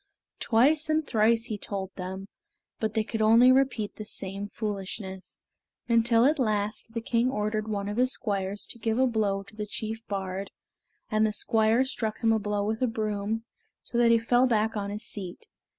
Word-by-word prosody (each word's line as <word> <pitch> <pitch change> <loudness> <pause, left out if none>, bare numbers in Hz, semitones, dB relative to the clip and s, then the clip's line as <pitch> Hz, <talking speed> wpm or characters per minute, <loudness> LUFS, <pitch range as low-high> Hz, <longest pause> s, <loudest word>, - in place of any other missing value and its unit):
Twice 295 +7 +3
and 310 0 +1
thrice 225 -1 +3
he 215 -4 -4
told 195 -2 -5
them, 190 +1 -6 0.5
but 220 0 -2
they 220 - +2
could 220 0 -4
only 230 +4 +7
repeat 255 -5 +1
the 215 - -5
same 200 -1 -4
foolishness, 195 -2 -5 0.5
until 230 0 +4
at 300 +2 +3
last 215 -1 -1
the 230 - -1
king 235 +2 +1
ordered 215 -2 -2
one 200 -2 -2
of 205 +2 -4
his 255 +1 +3
squires 200 -1 -2
to 235 - -9
give 225 0 -1
a 260 - +4
blow 210 -5 0
to 200 - -16
the 210 -1 -4
chief 220 +2 -5
bard, 195 -1 -4 0.6
and 215 0 +3
the 215 - +2
squire 220 +4 +2
struck 225 -5 -3
him 225 0 +4
a 220 - +2
blow 205 -1 -1
with 220 +2 -2
a 255 - +3
broom, 215 0 -2 0.4
so 240 - -1
that 235 -1 +5
he 230 - +6
fell 245 +3 +3
back 220 -2 +1
on 200 -1 -2
his 210 +2 -4
seat. 200 - -6
220 Hz, 190 wpm, -27 LUFS, 205-230 Hz, 0.6 s, only